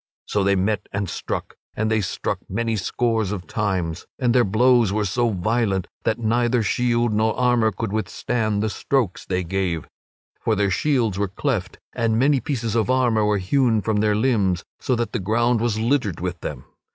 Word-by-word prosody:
So 100 - 0
they 100 0 +3
met 105 +2 -1
and 100 -1 -2
struck; - - -4 0.2
and 110 0 0
they 110 -1 +2
struck 90 - -2
many 115 +3 -1
scores 110 0 0
of 95 -4 -4
times, 95 -5 -2
and 125 -3 +1
their 125 -1 +5
blows 120 +1 +4
were 105 +1 0
so 120 +5 +1
violent 100 -1 0 0.2
that 110 - +1
neither 120 +1 +1
shield 120 +1 +1
nor 110 +1 +1
armor 120 -3 +3
could 110 -3 -4
withstand 110 -1 -1
the 110 - 0
strokes 125 -8 -1
they 90 -1 -1
gave. 90 -2 -2 0.5
For 110 - 0
their 100 -1 +1
shields 115 -5 +1
were 100 - +1
cleft 100 -1 -2 0.2
and 115 -2 +1
many 135 +3 +3
pieces 120 -6 -2
of 115 0 +1
armor 120 -4 +3
were 105 0 +2
hewn 115 +4 +2
from 110 -2 0
their 105 0 +2
limbs, 105 -6 +1 0.2
so 130 - 0
that 120 0 -2
the 120 - 0
ground 115 +4 +1
was 115 -2 0
littered 115 - 0
with 90 0 -3
them. 70 -5 -6
110 Hz, 185 wpm, -22 LUFS, 100-120 Hz, 0.5 s, their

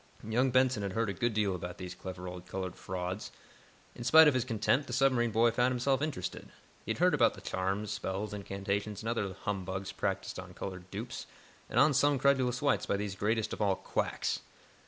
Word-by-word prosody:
Young 125 +4 +2
Benson 130 -2 +3
had 100 -2 -3
heard 115 -1 0
a - - -4
good 115 +4 -1
deal 105 -3 +2
about 90 0 -5
these 90 -1 -6
clever 90 -1 -7
old 90 0 -8
colored 95 -2 -4
frauds. 90 +2 -4 0.6
In 120 - -8
spite 160 +5 +8
of 150 - +5
his 130 -2 +1
contempt, 125 +4 +1
the 120 - -5
submarine 125 -2 +3
boy 115 +2 +4
found 125 +2 +2
himself 130 +2 +1
interested. 145 - -4 0.3
He - - -11
had - - -9
heard - - +4
about - - +4
the - - -10
charms, 95 +3 -2
spells, 105 0 -3
incantations 100 +1 -3
and 115 - -2
other 100 -5 -1
humbugs 95 -1 -3
practised - - -2
on - - -9
colored 90 -1 -6
dupes 110 +6 -6 0.4
and 120 - +1
on 145 +3 +6
some 145 +1 +4
credulous 130 -1 +2
whites 145 -2 +2
by 100 - +1
these 100 -1 -3
greatest 110 +2 0
of - - -5
all 100 -2 +3
quacks. - - -1
105 Hz, 200 wpm, -32 LUFS, 95-125 Hz, 0.6 s, spite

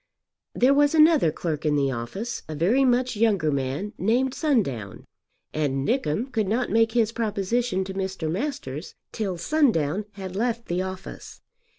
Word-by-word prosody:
There 260 +3 +4
was 290 +2 +3
another 310 - +5
clerk 155 -1 -3
in 150 -2 +2
the 140 -2 +1
office, 190 - -4
a 155 - -4
very 205 - +3
much 250 -1 +2
younger 205 -8 +2
man, 140 - -2
named 245 +6 +1
Sundown, 160 - -1 0.5
and 140 -3 -1
Nickem 240 - 0
could 220 -5 0
not 235 +5 0
make 225 0 +3
his 230 -2 +2
proposition 220 -1 -1
to 190 0 -6
Mr. 190 -3 -3
Masters 170 - -4 0.2
till 195 -5 -3
Sundown 205 - +1
had 190 -2 -7
left 235 +2 -1
the 175 +1 -1
office. 185 0 -8
200 Hz, 155 wpm, -25 LUFS, 160-240 Hz, 0.5 s, another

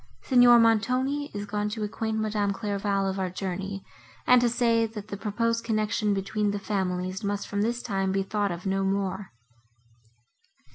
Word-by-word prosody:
Signor 245 -2 +6
Montoni 255 +6 +2
is 205 0 -5
gone 210 0 -2
to 215 0 -4
acquaint 220 +1 -2
Madame 210 -2 0
Clairval 200 -1 -1
of 190 0 -2
our 185 -1 -1
journey, 195 +1 -5 0.4
and 250 -1 +6
to 240 - +3
say, 230 -1 +2
that 210 -1 -9
the 200 - -4
proposed 230 +3 -1
connection 215 -2 0
between 205 +2 -1
the 205 - -1
families 185 -1 -2
must 200 0 -2
from 200 0 -2
this 235 +3 -1
time 195 -3 -1
be 195 0 0
thought 205 0 -1
of 175 +2 -6
no 195 0 0
more." 195 0 -2
205 Hz, 165 wpm, -27 LUFS, 195-225 Hz, 0.4 s, Signor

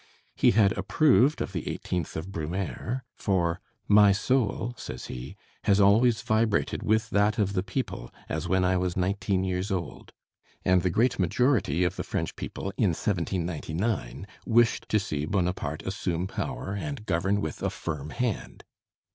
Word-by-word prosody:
He - - +4
had 100 -2 +4
approved 140 - +3
of - - -3
the 85 -5 -4
eighteenth 90 -4 -3
of 85 +5 -5
Brumaire: 95 +9 -3
for 90 -3 0 0.3
"my 105 -1 +7
soul," 115 +2 0
says - - -7
he, 60 +1 -7 0.3
"has 100 0 +4
always 110 +4 +4
vibrated 110 -1 +1
with 110 +1 +1
that 105 +1 +2
of 100 -3 +1
the 95 - +1
people 100 - -4 0.2
as 80 +2 -3
when 95 +1 +2
I 95 0 +2
was 90 -1 -1
nineteen 95 0 0
years 95 +1 -1
old;" 90 -5 -4 0.5
and 90 -1 +4
the 90 - +1
great 115 +8 +2
majority 95 - +2
of 90 - -1
the - - -2
French - - -3
people 95 - -5
in 100 -7 +3
1799 85 - -2 0.2
wished 120 0 +2
to 110 - +3
see 75 -6 -3
Bonaparte 90 -6 -1
assume 90 -3 -2
power 95 0 -4
and 120 +2 -5
govern 95 +2 +1
with 80 -6 -4
a - - 0
firm 75 -3 -5
hand. 120 +2 -3
95 Hz, 155 wpm, -27 LUFS, 90-110 Hz, 0.5 s, my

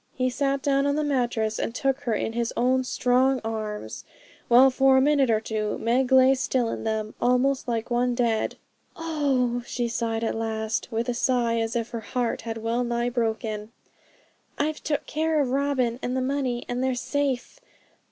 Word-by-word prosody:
He 255 0 0
sat 275 +1 -1
down 275 0 +2
on 285 - +1
the 305 - 0
mattress 240 -6 0
and 230 - -3
took 270 -1 0
her 230 -3 -1
in 225 - -2
his 235 0 -1
own 260 +2 +2
strong 255 +1 +2
arms, 215 - -5 0.4
while 255 +3 +7
for 270 0 +4
a - - +6
minute 280 -1 +3
or 220 -1 +3
two 215 -1 -3
Meg 250 +3 +1
lay 260 0 +7
still 255 -2 0
in - - -5
them, 220 -1 -2
almost 255 +2 +2
like 230 0 -2
one 245 0 +1
dead. 235 -3 0 0.4
'Oh!' 275 -7 0
she 240 -1 -2
said 230 -1 -2
at 225 - 0
last, 220 0 -2
with 230 +2 -1
a 245 - 0
sigh 240 -1 +1
as 225 +1 -2
if 235 0 -2
her 235 - -3
heart 235 +2 -2
had 225 -1 -5
well 230 +2 -1
nigh 240 0 -1
broken, 220 -2 -2 0.8
'I've 305 +2 -1
took 295 -2 -1
care 315 0 0
of 270 -4 +1
Robin 260 -3 0
and 250 +1 -2
the - - 0
money, 255 -2 -1
and 245 +1 -2
they're 260 -1 +1
safe. 265 - -2
245 Hz, 185 wpm, -25 LUFS, 230-265 Hz, 0.8 s, while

